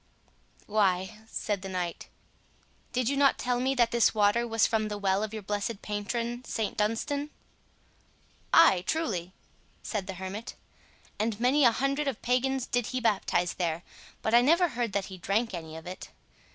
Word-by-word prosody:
"Why," 200 -1 +1
said 205 -3 -2
the 195 - -6
knight, 180 -2 -4 0.8
"did 250 -2 0
you 280 - +1
not 275 -1 +4
tell 245 -1 0
me 265 +2 +1
that 240 -2 +3
this 235 -1 +3
water 215 +3 +3
was 225 -2 +3
from 220 -1 +1
the 210 -1 -4
well 195 -1 +1
of 215 -1 -3
your 215 -1 -6
blessed 205 +2 -3
patron, 230 +4 -3
St 220 -4 -3
Dunstan?" 280 +8 -1 1.2
"Ay, 195 - +6
truly," 195 - -1 0.5
said 205 -4 -3
the 190 - -5
hermit, 190 +4 -6 0.6
"and 215 0 -1
many 260 +4 +4
a 235 - +7
hundred 275 +4 0
of 265 -5 -2
pagans 255 +1 +1
did 245 -2 -1
he 255 - -2
baptize 195 -6 +1
there, 170 -1 -2 0.4
but 220 - 0
I 240 - +8
never 335 +7 +4
heard 240 -5 -2
that 200 -1 0
he 190 -2 -9
drank 210 +5 0
any 160 -2 -6
of 160 - -10
it. 180 +1 -8
220 Hz, 170 wpm, -29 LUFS, 195-250 Hz, 1.2 s, I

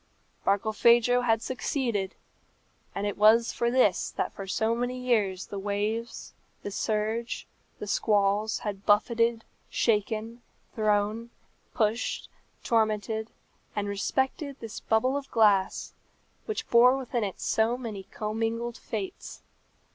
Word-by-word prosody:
Barkilphedro 235 +4 +4
had 225 -1 +2
succeeded, 240 -7 -2 0.8
and 200 - -2
it 205 - -2
was 225 +2 +5
for 235 - 0
this 240 -6 +3
that - - -3
for 195 - -7
so 220 +4 +1
many 245 +2 -2
years 215 -7 0
the 200 - -6
waves, 210 +4 -3 0.3
the 205 - -4
surge, 220 +3 -2 0.3
the - - -6
squalls 205 0 +1
had 200 -1 -4
buffeted, 230 +2 +2 0.3
shaken, 225 +1 0 0.3
thrown, 215 +1 0 0.5
pushed, 220 +1 0 0.3
tormented, 220 -1 0 0.5
and 205 -1 -1
respected 265 +7 -1
this 225 -1 -7
bubble 240 +5 +1
of 280 -1 -4
glass, 205 -4 +2 0.5
which 435 - -3
bore 250 +3 +6
within 245 -3 -2
it 195 -2 -4
so 225 +2 +1
many 225 -6 -6
commingled 225 +2 -3
fates. 205 -4 -6
220 Hz, 115 wpm, -28 LUFS, 205-235 Hz, 0.8 s, bore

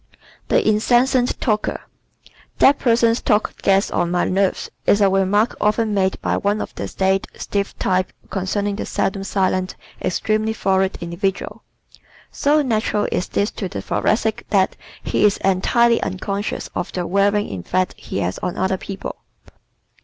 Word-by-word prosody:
The - - +2
Incessant 245 +4 +2
Talker 215 -4 -1 0.5
¶ - - -22 0.3
"That 280 +1 +5
person's 230 -1 +3
talk 210 -1 0
gets 195 +1 +2
on 175 - 0
my 175 0 +1
nerves," 190 0 0 0.2
is 205 - +5
a 200 -2 +4
remark 195 +4 +2
often 215 +1 +1
made 190 -1 +1
by - - +1
one 205 +1 0
of - - -5
the - - -5
staid, 190 0 0
stiff 200 -1 -3
types 185 0 0 0.2
concerning 200 +2 -1
the - - -3
seldom 195 0 -1
silent, 185 -1 0 0.3
extremely 215 +4 0
florid 190 -2 +1
individual. 180 +3 -3 0.7
So 295 +1 +2
natural 215 -4 0
is 180 - -1
this 205 +2 0
to 190 - -5
the - - -5
Thoracic 220 0 0
that 195 -3 +2 0.3
he - - 0
is 205 -1 +4
entirely 230 +5 +3
unconscious 200 +2 -3
of - - -3
the 180 -1 -2
wearing 200 +3 +1
effect 185 - -1
he - - -6
has 90 +1 -2
on 180 - -3
other 190 +1 0
people. 195 +1 -7
200 Hz, 155 wpm, -20 LUFS, 190-215 Hz, 0.7 s, That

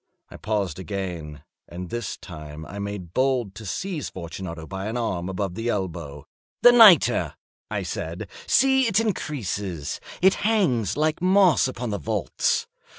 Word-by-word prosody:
I - - -9
paused 100 -6 -2
again, 90 -7 -5 0.2
and 90 0 -8
this 120 -2 -4
time 75 -3 -9
I 100 +6 -8
made 100 -4 -5
bold 130 -6 +1
to 110 0 -9
seize 180 - -3
Fortunato 85 -2 -7
by 95 +3 -5
an 115 +3 -3
arm 95 -7 -2
above 95 -1 -3
the 115 +5 -3
elbow. 85 -9 -4 0.4
"The 245 - +10
nitre!" 225 -7 +6 0.3
I - - -2
said: - - -5 0.2
"see, 265 -1 +4
it 215 -1 +3
increases. 105 - -3 0.2
It 190 +1 +5
hangs 150 - +1
like 155 +1 +1
moss 185 -6 +5
upon 125 -3 -4
the 100 - -2
vaults. 75 - 0
100 Hz, 150 wpm, -24 LUFS, -, 0.4 s, The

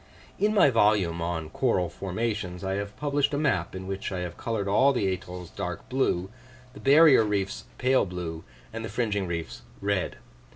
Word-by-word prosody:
In 210 +1 +3
my 145 -9 +6
volume 105 -7 +3
on 80 -2 -3
"Coral 105 -7 +1
Formations" 95 -2 -3
I 95 0 -1
have 100 +1 -4
published 145 -1 +1
a - - 0
map, 130 - 0
in 95 0 -6
which 95 +1 -4
I 90 -1 -3
have 90 -1 -5
coloured 110 -4 -3
all 130 +8 +4
the 105 -6 0
atolls 90 -1 -8
dark 90 -3 -5
blue, 100 -8 0 0.4
the - - -11
barrier 145 -3 +7
reefs 100 -2 -2
pale 130 -4 +3
blue, 85 -3 -5 0.3
and 115 0 -5
the 115 - -4
fringing 105 -5 -1
reefs 85 -7 -4 0.2
red. 100 -2 -1
100 Hz, 175 wpm, -27 LUFS, 90-120 Hz, 0.4 s, barrier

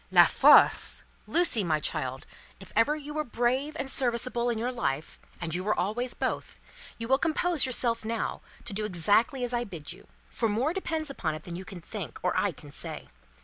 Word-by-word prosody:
"La - - +8
Force! - - +6 0.2
Lucie, 330 - +2
my 160 -3 +1
child, 130 -2 -2 0.3
if 195 - -13
ever 230 +8 +3
you 295 -1 -7
were 305 0 -1
brave 255 +4 -1
and 270 - -3
serviceable 240 -1 0
in 235 - -1
your 240 +3 -1
life 155 - -3 0.2
and 165 -2 -3
you 180 +1 -1
were 210 +2 0
always 225 +7 -1
both - - -3 0.4
you 230 - -5
will 265 +2 +3
compose 325 -2 +2
yourself 235 -2 +1
now, 225 +1 -3 0.2
to 235 - -3
do 215 +2 -1
exactly 210 - +2
as 245 0 -2
I 240 0 0
bid 170 -10 -7
you; - - -17 0.2
for 225 - -1
more 245 +10 0
depends 320 -5 -2
upon 160 - -2
it 155 - -9
than 175 - -7
you 185 +2 -7
can 190 -4 -9
think, - - -7
or - - +1
I - - +2
can - - -13
say. - - -4
235 Hz, 200 wpm, -28 LUFS, 190-265 Hz, 0.4 s, La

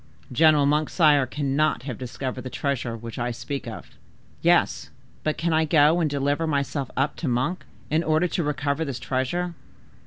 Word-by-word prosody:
"General 155 +1 +5
Monk, 150 +1 +2
sire, 145 -6 +4
cannot 145 0 0
have 130 -5 -6
discovered 130 +1 -5
the 130 - -6
treasure 125 -4 -2
which 115 +1 -8
I 120 +1 -1
speak 135 +3 -5
of." - - -8 0.5
"Yes, - - +2 0.3
but 155 - -1
can 170 0 0
I 160 0 +3
go 155 +1 +4
and 160 -3 +1
deliver 145 +3 0
myself 140 -2 -1
up 140 +3 +1
to 165 - -3
Monk, 130 +9 -1 0.3
in 155 +2 +3
order 155 +2 +2
to 175 - -1
recover 145 +1 -1
this 140 -5 -4
treasure? 140 +9 -2
145 Hz, 175 wpm, -25 LUFS, 130-155 Hz, 0.5 s, General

